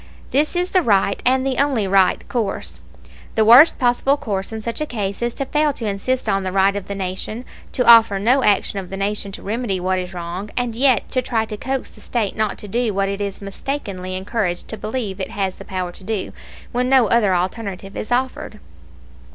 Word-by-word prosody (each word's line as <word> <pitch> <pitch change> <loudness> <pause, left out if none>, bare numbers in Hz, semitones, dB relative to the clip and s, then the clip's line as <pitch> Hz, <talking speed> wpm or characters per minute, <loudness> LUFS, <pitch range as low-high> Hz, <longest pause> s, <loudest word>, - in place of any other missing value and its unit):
This 300 +5 +1
is 355 +1 0
the 370 - +4
right, 200 - +2
and 260 +1 +3
the 265 -2 -1
only 270 -8 +2
right, 190 -1 +3
course. 220 -6 -3 0.6
The 220 - +3
worst 245 +9 +8
possible 250 +3 +2
course 205 -9 -3
in 220 -1 -6
such 230 +4 -4
a 305 - -1
case 200 -5 -3
is 240 0 -1
to 275 - -2
fail 295 +1 +1
to 235 - -5
insist 215 +6 -1
on 195 - +1
the 185 -1 -3
right 195 +1 +3
of 200 -2 -5
the 200 - -4
Nation, 195 +5 -4 0.3
to 250 - +1
offer 230 -4 +7
no 250 +7 +3
action 200 0 +2
of 185 -2 -8
the 195 - -5
Nation 200 0 -2
to - - -9
remedy 210 -2 -2
what 185 +1 0
is 180 0 -5
wrong, 180 +3 -6
and 245 -2 -1
yet 255 -3 +3
to 255 - +1
try 225 -3 -1
to 215 - -6
coax 265 +4 -3
the - - -17
State 220 -5 -2
not 215 -2 -1
to 210 - -8
do 230 0 -1
what 195 0 +1
it 200 +1 -3
is 200 0 -4
mistakenly 195 -4 -5
encouraged 190 -2 -2
to - - -4
believe 215 -3 -4
it - - -3
has 195 -2 -2
the - - -11
power 185 -2 -3
to 190 - -15
do, 210 -1 -3 0.4
when 250 +1 0
no 260 -3 +5
other 210 -5 +3
alternative 195 +1 -3
is 215 - -5
offered. 255 +1 -2
215 Hz, 215 wpm, -20 LUFS, 195-245 Hz, 0.6 s, worst